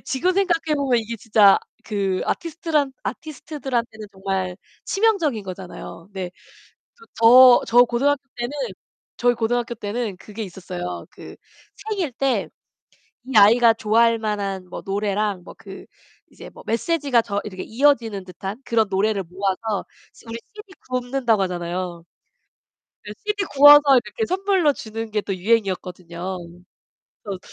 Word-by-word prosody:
지금 350 +8 0
생각해 340 -5 +1
보면 270 -4 +1
이게 230 +1 -5
진짜 210 -2 +5 0.3
그 195 -3 -1
아티스트란 320 -4 -1
아티스트들한테는 265 -7 -5
정말 190 -2 -3 0.8
치명적인 210 - -6
거잖아요. 185 -2 -9
네. 185 -2 -5 0.7
그리고 460 -1 -20
저 245 +2 +8
저 245 +1 +6
고등학교 270 +4 0
때는 240 +2 -3 0.7
저희 245 0 +2
고등학교 235 +1 -1
때는 215 -2 -4
그게 210 +3 -9
있었어요. 90 - -6
그 - - -12 0.5
생일 380 -10 -2
때 270 +2 0 0.8
이 265 - -6
아이가 230 +3 +7
좋아할 225 +1 +2
만한 200 -4 -3
뭐 - - -8
노래랑 200 -1 -1
뭐 - - -11
그 - - -11 0.4
이제 - - -12
뭐 - - -14
메시지가 275 +1 +1
저 205 -2 -3
이렇게 190 -3 -7
이어지는 230 -5 +1
듯한 190 +5 -7
그런 225 -2 +2
노래를 200 +1 +1
모아서 195 +4 -3 0.3
시 - - -20
우리 230 0 -5 0.2
CD 420 -3 -12 0.2
굽는다고 250 -3 0
하잖아요. 175 -1 -4 1.0
이제 210 0 -8
CD 415 -1 -1
구워서 290 -2 +8 0.2
이렇게 445 - -3
선물로 380 -5 +2
주는 225 -3 -6
게 210 - +1
또 195 -2 -4
유행이었거든요. 185 -3 -2 0.9
그래서 200 -3 -5
225 Hz, 315 characters per minute, -22 LUFS, 195-265 Hz, 1.0 s, 저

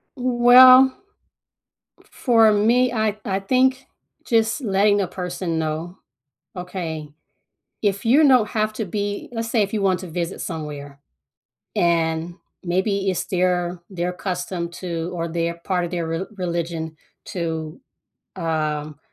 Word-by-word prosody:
Well, 255 +1 +7 1.2
for 225 -4 +4
me, 235 +5 +3
I 215 -2 0
I 195 -1 -1
think 260 +5 +1 0.4
just 225 +4 +1
letting 205 -2 +2
a 190 - -1
person 180 -2 -4
know. 160 +3 -4 0.6
Okay, 170 -4 -5 0.7
if 200 -1 -1
you 285 +6 +5
don't 250 -5 +5
have 215 0 -1
to 220 0 -3
be 205 +2 -4
let's 225 -1 -4
say 230 -2 +2
if 200 0 -1
you 215 - 0
want 190 -2 +2
to 185 - -7
visit 170 0 -4
somewhere, 145 -4 -6 0.8
and 165 0 0 0.3
maybe 195 +2 0
it's 185 - -2
their 180 -1 0
their 180 -2 -3
custom 180 -2 -4
to, 170 -1 -5
or 170 -1 -3
their 170 0 -2
part 180 -2 0
of 170 - -7
their 170 -2 -2
re 165 +3 -3
religion 170 -3 -3 0.3
to, 160 -1 -4 0.6
um, 155 -3 -2
180 Hz, 130 wpm, -22 LUFS, 170-215 Hz, 1.2 s, Well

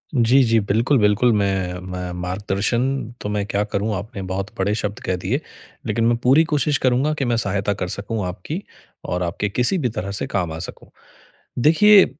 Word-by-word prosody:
जी, 125 +3 +5
जी। 115 -1 +3
बिल्कुल, 115 +7 +2
बिल्कुल, 105 +4 +4
मैं 95 -3 0
मैं 90 -1 -4
मार्गदर्शन 100 +6 -1 0.4
तो 105 - -3
मैं 105 -1 -1
क्या 100 +1 0
करूँ, 105 +1 -2
आपने 100 +1 -6
बहुत 95 +2 -3
बड़े 100 +2 +1
शब्द 105 +2 -3
कह 95 - 0
दिए। 125 +10 0 0.5
लेकिन 115 +1 +1
मैं 120 0 +3
पूरी 135 +6 +6
कोशिश 145 -1 +2
करूँगा 130 +4 +2
कि 135 - 0
मैं 120 -1 +1
सहायता 100 -1 0
कर 90 -2 -4
सकूँ 100 +1 -3
आपकी 120 - -5 0.4
और 90 0 -1
आपके 90 +4 -2
किसी 125 - +2
भी 130 -7 0
तरह 105 -3 -4
से - - -3
काम 90 -5 -1
आ 80 - -6
सकूँ। - - -13 0.7
देखिए, 195 - +7
105 Hz, 185 wpm, -21 LUFS, 100-125 Hz, 0.7 s, देखिए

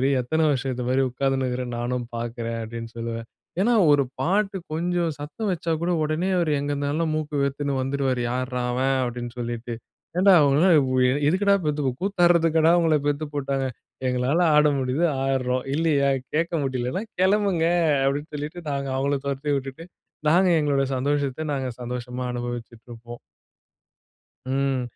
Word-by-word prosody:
இரு. 135 - +2
எத்தன 160 +6 +1
வருஷத்துக்கு 135 -2 0
இந்த 125 - -3
மாதிரி 130 +1 +2
உட்கார்ந்துனுட்டு 135 +1 0
இருக்கிறேன்னு 125 -1 -3
நானும் 120 0 -2
பார்க்கிறேன் 115 0 -4
அப்படின்னு 115 +1 -6
சொல்லுவேன். 115 0 -4 0.3
ஏன்னா 235 +5 +3 0.2
ஒரு 145 -1 +4 0.2
பாட்டு 195 +2 +1 0.2
கொஞ்சம் 170 +1 0
சத்தம் 175 +9 -4
வச்சா 170 -1 -2
கூட 175 - 0
உடனே 155 +5 -1
அவரு 160 -3 +1
எங்கே 145 0 -2
இருந்தாலும் 145 +3 -1
மூக்கு 150 -2 -2
வேர்த்துன்ட்டு 140 0 -1
வந்துருவாரு. 130 -1 -1
யாருடா 125 0 -2
அவன் 130 +2 +1
அப்டின்னு 120 0 -5
சொல்லிட்டு. 120 0 -4 0.4
ஏன்டா 195 +2 +6
உங்கள 150 +7 +4 0.6
எதுக்குடா 200 +4 +3
பெத்துருக்கு 145 -4 -1
கூத்தாடுறதுக்காடா 170 -4 +3
உங்கள 160 -2 +3
பெத்து 145 +1 0
போட்டாங்க? 135 -1 -1 0.4
எங்களால 125 +6 +1 0.2
ஆட 150 0 +6
முடியுது, 130 +5 0 0.2
ஆடுறோம். 130 -1 0
இல்லையா 150 -3 +2 0.3
கேட்க 170 +2 0
முடியல்லைன்னா 130 - -2 0.2
கெளம்புங்க 190 -3 +2 0.4
அப்படின்னு 145 +3 -1
சொல்லிட்டு, 150 +4 -5
நாங்க 140 -1 -2
அவங்கள 140 +1 0
தொரத்தி 140 +1 -2
விட்டுட்டு 135 +4 -6 0.4
நாங்க 180 +4 +5
எங்களோட 145 -2 +1
சந்தோஷத்த 145 +2 -1
நாங்க 135 -2 -2
சந்தோஷமா 125 +1 -5
அனுபவிச்சுட்டு 120 -1 -6
இருப்போம். 120 0 -10 1.3
ம். 135 -1 0
140 Hz, 140 wpm, -24 LUFS, 125-160 Hz, 1.3 s, ஏன்டா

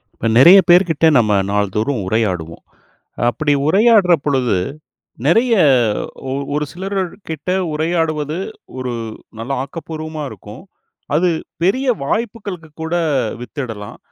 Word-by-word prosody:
இப்ப, - - -6
நெறய 175 +10 +9
பேர்கிட்ட 175 -3 +4
நம்ம 110 -3 +3 0.2
நாள்தோறும் 105 +5 0
உரையாடுவோம். 90 -7 -2 0.7
அப்படி 145 +5 0
உரையாடுற 200 0 +5
பொழுது 130 -7 +1 0.7
நெறய 230 - +4 0.8
ஒ - - -2 0.2
ஒரு 150 0 0
சிலர்க்கிட்ட 185 -3 -4 0.2
உரையாடுவது, 155 -1 -1 0.4
ஒரு 125 -1 -3 0.5
நல்ல 115 +4 -6
ஆக்கப்பூர்வமா 155 +1 -6
இருக்கும். 105 +8 -11 0.5
அது 175 +3 +2 0.3
பெரிய 255 +9 +1 0.2
வாய்ப்புக்களுக்கு 200 -3 -4
கூட 160 +2 -2 0.5
வித்திடலாம். 115 -5 -7
155 Hz, 100 wpm, -18 LUFS, 125-180 Hz, 0.8 s, நெறய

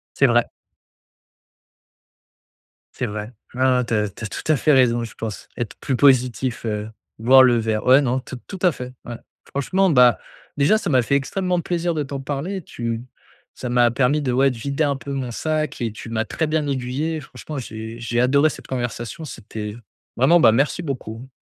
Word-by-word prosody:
C'est 140 - +4
vrai. 120 -1 +3 2.5
C'est - - -3
vrai. 105 +2 -5 0.2
Ouais, 130 - -3
ouais. 125 -2 +3
Tu 115 - -3
as 105 -1 +1
tu 100 - -12
as - - -2
tout 130 - -2
à 155 - +5
fait 150 +4 +3
raison. 120 -3 +4
Je 115 - -7
pense 110 -3 -6
être 120 -4 -4
plus 130 - -1
positif, 130 -2 +2
heu, 105 -1 -3 0.3
boire 130 +3 +7
le 120 -2 +4
verre, 110 -1 -1
ouais, 130 +3 +7
non, 130 -1 0
tout 130 0 -8
tout 190 - -7
à 180 -2 +4
fait, 125 -2 -8
ouais. 120 - -6 0.3
Franchement, 185 +8 +1
bah, 125 - +5 0.4
déjà 145 +10 +4
ça 200 - -3
m'a 130 -4 +4
fait 130 +4 0
extrêmement 180 +5 0
plaisir 170 0 -1
de 150 - -1
t'en 135 0 -5
parler. 150 +8 -4
Tu 115 -3 -4 0.5
ça 125 - -6
m'a 120 -1 +4
permis 135 +4 +2
de, 130 -3 -1
ouais, 135 +2 +4
de 125 - -8
vider 140 +5 -1
un 140 -1 +1
peu 135 +2 -7
mon 130 -3 -3
sac 155 0 -2
et 115 - -1
tu 110 +2 -9
m'as 115 0 -1
très 160 - -2
bien 155 -1 0
aiguillé 140 +5 -2
franchement. 150 +1 -9
J'ai 110 -1 -7
j'ai 120 0 -1
adoré 140 +5 +4
cette - - -10
conversation. 120 +2 -4
C'était 110 -5 -7 0.4
vraiment, 150 +8 +5
bah, 135 - +7
merci 140 +9 +1
beaucoup. 125 -3 -6
130 Hz, 195 wpm, -22 LUFS, 120-145 Hz, 2.5 s, boire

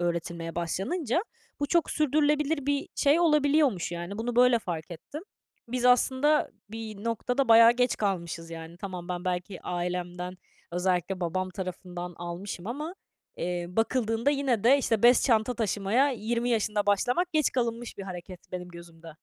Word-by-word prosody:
öğretilmeye 170 -1 -3
başlanınca 235 - -1 0.4
bu 285 - +1
çok 340 +2 +2
sürdürülebilir 300 0 +1
bir 285 -1 0
şey 290 +4 +3
olabiliyormuş, 290 - +3
yani. 175 +5 -5
Bunu 240 +1 -3
böyle 250 -1 +6
fark 170 -4 -5
ettim. 285 - -8 0.5
Biz 250 0 -2
aslında 260 +4 +3 0.2
bir 220 -2 -7
noktada 240 +3 0
bayağı 230 +1 +8
geç 250 0 +1
kalmışız, 170 -5 -2
yani. 165 0 -8
Tamam 180 -2 -7
ben 180 0 -4
belki 180 +1 -3
ailemden, 180 0 -3 0.4
özellikle 180 +1 0
babam 185 +2 -1
tarafından, 180 -1 -6
almışım 175 +2 -6
ama, 300 +9 -4 0.4
eee, 175 0 -2
bakıldığında 225 +4 +1
yine 270 -7 0
de, 270 +4 +6
işte, 225 -5 0
bez 245 +1 +6
çanta 230 -1 +2
taşımaya 220 +4 +1
20 235 0 -1
yaşında 210 -2 0
başlamak 245 - +1
geç 310 -2 +2
kalınmış 235 -3 -2
bir - - -4
hareket 185 -1 -9
benim 180 0 -5
gözümde. 170 -1 -12
215 Hz, 145 wpm, -28 LUFS, 180-255 Hz, 0.5 s, bayağı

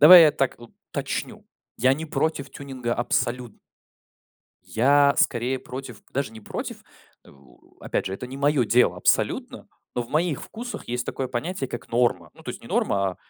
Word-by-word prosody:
давай 170 +4 +12
я 150 - +5
так 135 -3 0
уточню, 120 -1 -5 0.3
я 130 +1 +5
не 160 +3 -5
против 150 -3 -1
тюнинга 130 -4 -4
абсолютн 120 -1 -1 1.1
я 140 +4 +4
скорее 125 +2 +2
против, 125 -4 -8
даже 135 -4 -1
не 110 - -10
против, - - -6 0.4
э, - - -16 0.5
опять - - -2
же, 95 - -2
это 125 - -6
не 130 - -8
мое 140 -2 +3
дело 120 +2 +4
абсолютно, - - 0 0.3
но 120 - 0
в 120 - -12
моих 155 -1 +1
вкусах 240 +2 -7
есть 125 0 -2
такое 130 -2 -3
понятие, 135 +2 -3
как 120 - -7
норма. 115 -9 +1
Ну, - - -16
то - - -5
есть - - -8
не - - -11
норма, 100 -1 +1
а - - -15
130 Hz, 170 wpm, -25 LUFS, 120-145 Hz, 1.1 s, давай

